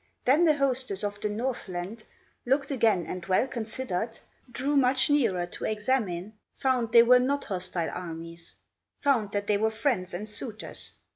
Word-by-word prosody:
Then 295 +7 +5
the 310 -2 +5
hostess 255 -7 0
of 205 0 -3
the 210 - 0
Northland 210 -3 -4 0.4
Looked 270 +2 +1
again 225 -9 +2
and 185 -1 -5
well 190 +6 +3
considered, 225 -3 -4 0.3
Drew 270 +5 -1
much 260 +1 +3
nearer 220 -12 +2
to 175 - -6
examine, 210 -4 -1 0.2
Found 250 -4 0
they 230 0 +8
were 250 +1 +7
not 280 +3 0
hostile 180 -3 -2
armies, 165 -1 -7 0.5
Found 235 -8 +2
that 205 0 -1
they 205 0 +2
were 220 +2 +2
friends 220 -6 -1
and 210 +4 -5
suitors. 215 +1 -5
220 Hz, 155 wpm, -28 LUFS, 190-260 Hz, 0.5 s, they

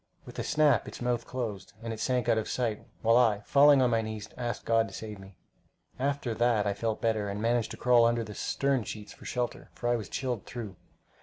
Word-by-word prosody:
With - - -9
a - - -1
snap 150 -6 +3
its - - -8
mouth 120 -1 -1
closed, 110 -8 -5
and 115 -1 -3
it 110 - -7
sank 125 0 0
out 115 -2 +3
of 110 - -4
sight, 115 -4 -2 0.2
while 115 +1 +5
I, 110 -5 +3
falling 140 +3 +6
on 125 - +2
my 115 -1 +2
knees, 110 -1 -5
asked 120 -2 -4
God 115 0 +3
to - - -10
save 105 -2 -7
me. 95 0 -13 0.6
After 140 -3 -1
that 115 -2 +2
I 100 - +1
felt 110 +2 -3
better, 110 -3 +1
and 100 +1 -4
managed 115 +1 +1
to - - -7
crawl 120 -1 +5
under 115 0 +2
the 105 - -8
stem 135 +4 0
sheets 105 0 -7
for - - -15
shelter, 125 -1 -3
for 120 - -3
I 120 - +3
was 110 -3 -5
chilled 125 -5 -3
through. 110 -6 -6
115 Hz, 230 wpm, -29 LUFS, 110-125 Hz, 0.6 s, falling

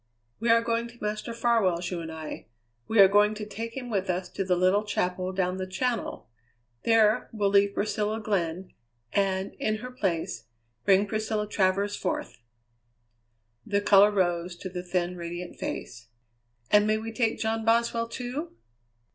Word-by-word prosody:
"We 230 +1 0
are 230 0 +5
going 230 0 0
to 240 0 -15
Master 210 +2 -3
Farwell's, 215 -7 +1
you 180 - -2
and 160 -1 -6
I. 160 -1 -7 0.4
We 225 - -1
are 195 -1 +10
going 205 +2 +4
to 210 0 -5
take 230 +3 -6
him 245 -2 -5
with 195 -3 -1
us 180 0 -1
to 195 - -3
the 185 -1 +1
little 185 +3 +3
chapel 185 -3 -1
down 185 -1 -1
the 185 0 -4
Channel; 240 +5 -2 0.6
there 225 0 +3
we'll 205 -3 0
leave 200 0 +4
Priscilla 210 +1 -1
Glenn, 185 -4 -2 0.4
and, 190 -1 0
in 215 - 0
her 250 +4 -7
place, 185 -9 -2 0.4
bring 195 0 +5
Priscilla 215 0 -2
Travers 200 0 +1
forth." 180 - -4 1.2
The 200 +6 0
colour 205 0 +6
rose 175 -3 0
to 185 +2 -7
the 180 0 -5
thin, 180 0 -2
radiant 175 +1 -6
face. 115 0 -5 0.6
"And 210 0 +5
may 215 0 +2
we 225 +1 -5
take 230 -2 +1
John 225 0 -1
Boswell, 230 +1 +2
too?" 255 +7 -5
205 Hz, 165 wpm, -27 LUFS, 185-225 Hz, 1.2 s, are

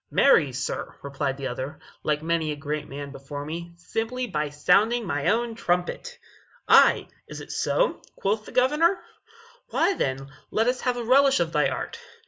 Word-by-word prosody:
"Marry, 160 - +4
sir," 135 +2 -4
replied 140 -1 -2
the 140 - -5
other, 130 +3 -4 0.2
"like 150 0 -1
many 165 -1 0
a - - -3
great 150 +1 -4
man 140 +1 -7
before 145 +1 -7
me, 170 +2 -6
simply 225 +8 -3
by 150 -9 -2
sounding 210 +10 +2
my 145 -5 -1
own 230 +2 +1
trumpet." 180 - -2 0.5
"Ay, - - +6 0.2
is - - -8
it - - -9
so?" - - 0
quoth 210 +2 -1
the - - -9
Governor; 300 +9 +3 0.7
"why, - - +2
then, 135 - -3 0.2
let 225 - +1
us 250 +1 0
have 250 -1 0
a 240 - -3
relish 270 +3 +5
of 165 -1 -1
thy 150 -2 +3
art." - - -5
170 Hz, 170 wpm, -25 LUFS, 145-240 Hz, 0.7 s, Ay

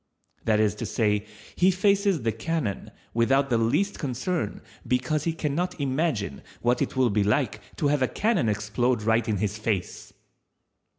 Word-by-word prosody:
That 110 -1 +3
is 105 -2 +3
to 115 - -2
say, 105 -1 0 0.3
he 180 - +4
faces 195 - +2
the 115 - +2
cannon 155 -8 -3 0.2
without 135 +4 +2
the 115 - +3
least 145 - +1
concern, 140 - -2 0.2
because 130 +4 0
he 165 - +2
can 150 -3 -2
not 180 +2 -2
imagine 135 - -1 0.2
what 120 +1 +2
it - - -1
will 130 -3 +3
be 100 0 +2
like 105 0 0
to 145 - +1
have 145 -1 +1
a 130 - +3
cannon 210 - +1
explode 105 +3 0
right 115 +1 +2
in 105 - +1
his 105 +2 -2
face. 105 -4 -3
125 Hz, 170 wpm, -26 LUFS, 110-155 Hz, 0.3 s, he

